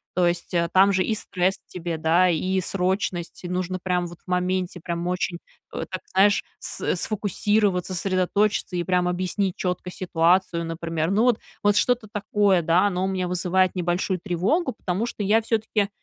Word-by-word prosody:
то 180 0 +3
есть, 175 +1 -1
э, 170 -1 +1
там 195 +1 +5
же 185 - +2
и 220 - 0
стресс 190 -2 -1
тебе, 170 -2 -4
да, 165 +3 +3
и 185 +3 0
срочность, 185 -1 -2
и 175 - -5
нужно 185 0 -2
прям 180 -1 0
вот 175 0 -12
в 180 - -7
моменте, 180 0 -1
прям 170 0 -4
очень, 180 -1 -2 0.3
э, - - -3
так 185 - -4
знаешь, 205 +2 +4
с - - -1
сфокусироваться, 205 -2 0
сосредоточиться 185 +1 0
и 175 - 0
прям 180 -1 +1
объяснить 185 +1 -1
четко 180 0 -3
ситуацию, 175 0 +1
например. 165 0 -2
Ну, 215 +4 +3
вот 245 -3 +3 0.2
вот 205 0 +4
что-то 235 +2 +2
такое, 205 -3 +2
да, 170 +5 +3
оно 185 -1 -1
у - - +1
меня 185 -1 -1
вызывает 180 +1 +1
небольшую 180 +1 -1
тревогу, 205 - 0
потому 195 0 -2
что 235 - -6
я 210 +3 +3
всё-таки 220 -2 0
185 Hz, 175 wpm, -24 LUFS, 175-200 Hz, 0.3 s, там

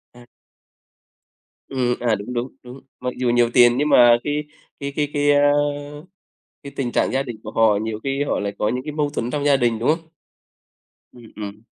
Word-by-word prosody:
À. 120 - -15 1.4
Ừm, 125 -2 0
à, 115 -3 +1
đúng, 105 +5 -7
đúng, 120 +1 -2 0.2
đúng. 125 +2 -11 0.2
Mặc 125 0 -3
dù 125 -1 0
nhiều 120 0 +3
tiền 120 -1 +6
nhưng 150 +2 +1
mà 120 -3 +7
cái 150 +1 -2 0.4
cái 140 0 -5
cái 150 -1 0
cái, 145 -1 +2
á, 145 0 +4 1.1
cái 140 - -8
tình 125 -3 -2
trạng - - +1
gia 135 +1 +1
đình 120 -3 -7
của 110 - -7
họ 110 -2 +3
nhiều 110 -1 -4
khi 135 +1 -1
họ - - -1
lại 100 0 -3
có 105 - 0
những 125 +3 -3
cái 150 - -5
mâu 150 -1 -1
thuẫn 125 -4 -3
trong 145 -1 -2
gia 140 -1 +4
đình, 120 -3 0
đúng 120 - 0
không? 165 +1 0 1.1
Ừm, 120 -3 -15
ừm. 105 +1 -7
125 Hz, 205 wpm, -21 LUFS, 120-145 Hz, 1.4 s, mà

